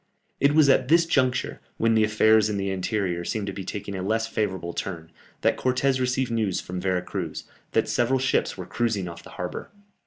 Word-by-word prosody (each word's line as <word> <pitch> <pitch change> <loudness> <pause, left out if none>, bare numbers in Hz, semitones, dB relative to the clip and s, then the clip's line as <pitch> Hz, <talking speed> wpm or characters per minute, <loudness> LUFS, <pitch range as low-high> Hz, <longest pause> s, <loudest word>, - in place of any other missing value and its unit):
It 140 +1 +3
was 155 -2 +6
at 130 -2 +4
this 165 +3 +5
juncture, 130 -6 0 0.2
when 115 0 +2
the 110 -1 +4
affairs 110 0 +4
in 105 - -1
the 100 0 -1
interior 95 -2 -1
seemed 105 +3 -2
to 100 - -4
be 95 - -6
taking 100 +1 -5
a 95 - -4
less 110 +4 0
favourable 95 -6 -2
turn, 80 -4 -5 0.3
that - - +2
Cortès 130 +1 +1
received 130 0 0
news 105 -5 0
from 90 0 -5
Vera 90 -1 0
Cruz, 90 -4 -5 0.3
that - - +2
several 125 +2 +2
ships 130 -5 0
were 90 - -6
cruising 100 -1 -1
off 85 -1 -8
the - - -13
harbour. - - -5
105 Hz, 205 wpm, -25 LUFS, 95-125 Hz, 0.3 s, was